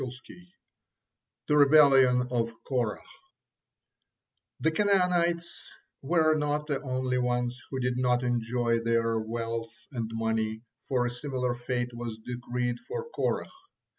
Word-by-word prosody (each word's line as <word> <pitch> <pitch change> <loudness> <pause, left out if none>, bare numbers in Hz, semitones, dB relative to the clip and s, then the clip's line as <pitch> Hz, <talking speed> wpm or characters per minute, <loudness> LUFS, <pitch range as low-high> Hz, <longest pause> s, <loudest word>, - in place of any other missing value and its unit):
THE 150 - +3
REBELLION 135 -4 +6
OF 115 -2 0
KORAH 120 -6 -1 1.6
The 160 - +2
Canaanites 175 -2 +2 0.5
were 155 +2 +3
not 150 0 0
the 145 -3 -2
only 130 -1 -1
ones 125 0 -1
who 130 - -3
did 125 0 -1
not 125 0 +2
enjoy 120 -1 0
their 115 -1 +1
wealth 115 +1 -4 0.2
and 115 -4 -3
money, 110 0 -1 0.2
for 125 -2 +1
a - - 0
similar 125 -1 -2
fate 120 0 -3
was 120 -2 -5
decreed 120 0 -3
for 470 -1 -6
Korah. - - -1
125 Hz, 115 wpm, -28 LUFS, 120-145 Hz, 1.6 s, REBELLION